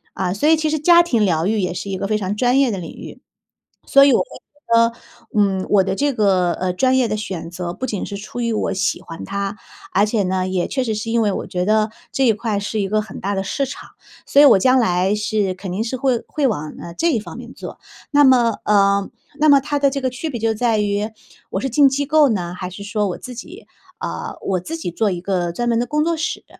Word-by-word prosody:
嗯， 185 0 -1
所 295 +10 +2
以 320 - +5
其 310 0 0
实 310 0 -1
家 345 +3 +6
庭 245 -11 +1
疗 170 -3 +1
愈 215 0 +1
也 180 -2 -1
是 195 - -5
一 195 - -2
个 195 - -3
非 210 +1 0
常 200 -1 -3
专 250 +4 +2
业 270 -4 +3
的 200 - -3
领 175 -3 -7
域。 - - -11 0.7
所 275 0 +6
以 280 - +5
我 - - +4
会 - - +1
觉 290 - -35
得， 230 0 +5 0.4
嗯， 195 -2 +2
我 200 -2 +4
的 190 - -2
这 285 +4 +1
个， 190 -6 +2
呃， 185 +1 -2
专 260 +8 +2
业 255 -3 +2
的 215 - -1
选 190 -6 -5
择 175 0 -5
不 260 - -4
仅 205 -6 -3
是 200 - -6
出 210 +4 -7
于 235 -1 0
我 215 - -1
喜 190 -2 -1
欢 165 -1 -9
它， 200 +1 -3 0.4
而 200 +2 +3
且 215 -1 0
呢， 185 0 -1
也 185 -1 -1
确 260 -2 -1
实 225 -3 -1
是 215 +2 -4
因 230 0 +2
为 210 -2 +1
我 - - -4
觉 180 0 -2
得 215 +2 +2 0.2
这 270 - +1
一 235 - +5
块 215 -2 -2
是 205 +2 -3
一 195 - -1
个 215 +2 +1
很 215 - -10
大 200 +1 -2
的 195 - -1
市 275 +8 -2
场。 265 - -9 0.4
所 280 - +4
以 - - +9
我 275 - +7
将 255 +6 +4
来 185 -4 +2
是 210 -2 0
肯 185 0 -7
定 195 +4 -1
是 235 +3 -3
会 260 -2 +1
会 295 -3 0
往， 155 - -2
呃， 170 - -9
这 335 - +1
一 240 - +1
方 215 - -8
面 - - -10
做。 - - -9 0.3
那 290 0 +5
么 245 -5 +4
呃， 200 -1 +3 0.3
那 305 - +4
么 285 -1 +8
它 290 +1 -2
的 280 -1 +3
这 275 +1 -3
个 260 - 0
区 260 +6 -5
别 245 - -4
就 225 0 0
在 225 0 +1
于 205 0 0 0.4
我 - - -2
是 270 - -2
进 275 +3 +5
机 280 +2 -1
构 305 -1 +4
呢， 180 -6 -2
还 180 0 -5
是 195 +2 -9
说 205 0 -1
我 180 - -5
自 255 - -9
己 360 - -10 0.3
啊， - - -5
我 185 -2 -1
自 320 - -6
己 320 - -5
做 215 +4 +1
一 180 -2 -3
个 180 -2 -1
专 240 +7 -2
门 230 -1 +2
的 245 - -1
工 300 +2 0
作 335 0 0
室。 315 +2 -3
215 Hz, 285 characters per minute, -20 LUFS, 195-260 Hz, 0.7 s, 以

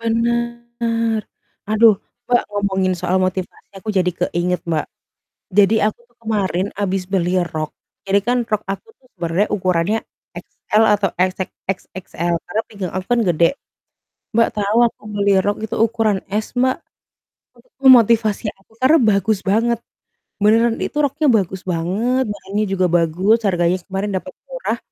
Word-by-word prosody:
Benar, 235 0 -1 0.5
aduh, 215 -1 +5 0.2
Mbak, 245 0 +2
ngomongin 190 -2 0
soal 180 +2 0
motivasi 185 0 -3
aku 215 +3 -4
jadi 185 -2 +2
keinget, 180 0 -1
Mbak. 160 -3 -1 0.7
Jadi, 205 +2 +5
aku 215 +2 -3
tuh 240 0 -32
kemarin 200 -5 -1
abis 195 -2 -2
beli 185 -1 +1
rok. 155 -2 -4 0.3
Jadi, 195 +1 +2
kan, 245 0 +2
rok 215 -2 -3
aku 195 - -5
tuh 255 - -27
sebenarnya 175 +2 0
ukurannya 185 +2 +1 0.4
XL 215 +1 -1 0.2
atau 195 -3 0
XX 185 +1 0 0.2
XXL 180 -2 -4
karena 220 - -2
pinggang 200 -5 -6
aku 185 0 -3
kan 240 - +2
gede. 170 - +2 0.8
Mbak, 230 0 +4
tahu 205 +1 0
aku - - -25
beli 200 -1 +2
rok 205 0 +1
itu 220 - -4
ukuran 225 -2 +2
S, 215 +4 -3
Mbak, 255 +1 +2 0.9
itu 480 - -19
motivasi 225 -1 +2
aku, 195 +3 -29
karena 265 +5 +5
bagus 200 +1 +1
banget. 230 +4 +2 0.6
Beneran 225 +2 +4
itu - - -4
roknya 290 0 +2
bagus 190 -4 0
banget, 195 +9 0
bahannya 205 0 -3
juga 190 -2 +1
bagus, 175 +6 +3
harganya 175 -1 +2
kemarin 195 +1 -3
dapat - - -11 0.2
murah. - - -3
205 Hz, 145 wpm, -19 LUFS, 185-230 Hz, 0.9 s, aduh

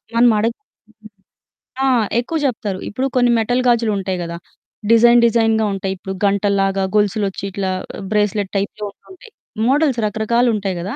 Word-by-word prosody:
మనమడగ్ 230 -1 +3 1.3
ఆ! - - +3 0.3
ఎక్కువ 285 +7 -2
జెప్తారు. 210 -7 -2
ఇప్పుడు 255 +5 -2
కొన్ని 245 -1 +4
మెటల్ 245 +3 0
గాజులుంటాయి 210 -6 0
కదా! 170 0 -6 0.5
డిజైన్ 235 +1 +6
డిజైన్‌గా 225 -1 +2
ఉంటాయి. 195 0 -3
ఇప్పుడు 190 +1 -6
గంటల్లాగా, 195 -1 +1
గొలుసులొచ్చి 205 -2 0
ఇట్లా 190 -1 -2 0.4
బ్రేస్లెట్ 210 -2 0
టైప్‌లో 205 +2 -4
ఉంటుంటాయి. 380 - -17 0.4
మోడల్స్ 275 -2 +2
రకరకాలుంటాయి 220 -2 0
గదా! 200 +8 -5
215 Hz, 120 wpm, -18 LUFS, 195-235 Hz, 1.3 s, డిజైన్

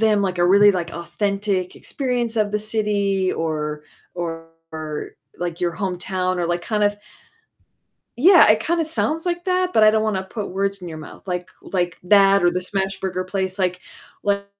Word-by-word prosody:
them, 215 -2 +3
like, 185 -2 -2
a 175 - +4
really, 200 +3 +7
like, 175 -3 -2
authentic 195 +2 -2
experience 245 -4 -2
of 210 -2 +1
the 210 - +1
city 205 -3 0
or 150 -2 -3 0.3
or, 165 -2 -6 0.2
like, 175 0 -4
your 175 -1 0
hometown 185 -1 -2
or, 175 -1 -1
like, 175 +1 -1
kind 210 +1 0
of 205 0 +1 1.2
yeah, 345 - +7
it 215 - +4
kinda 335 0 0
sounds 320 0 -1
like 350 -1 -2
that, 365 0 +1
but 220 - +4
I 215 - +8
don't 215 0 +1
wanna 210 -3 0
put 205 +2 -6
words 195 0 -2
in 175 - -6
your 160 -1 -7
mouth, 155 - -12
like 180 0 -3
like, 175 -2 -2
that 195 +1 +5
or 175 - +5
the 180 +1 -2
smash 195 +1 -3
burger 185 -1 -2
place, 190 0 -3
like 180 -1 0 0.4
like, 200 0 0
195 Hz, 180 wpm, -21 LUFS, 175-210 Hz, 1.2 s, I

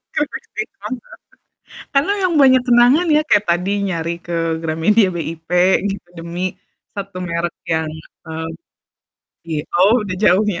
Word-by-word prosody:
Keripik 295 - -2
singkong, 265 -10 -5 1.0
karena 280 +8 +3
memang 365 -3 +1
banyak 260 -1 +6
kenangan 245 +8 +5
ya, - - +5
kayak 205 0 +4
tadi 180 +3 0 0.2
nyari 170 -2 -2
ke 170 - -3 0.3
Gramedia 165 +6 +2
BIP, 165 -1 -6 0.4
gitu 195 -3 -7
demi, 175 +2 -3 0.4
satu 200 -2 -6
merek 170 +1 -2 0.2
yang, 160 -1 0 0.4
mmm 160 0 -5 1.0
iy 155 -2 -2
oh, 210 +6 +4
udah 185 -2 -4
jauh 210 0 +4
ya? 195 -5 -1
185 Hz, 135 wpm, -19 LUFS, 170-240 Hz, 1.0 s, banyak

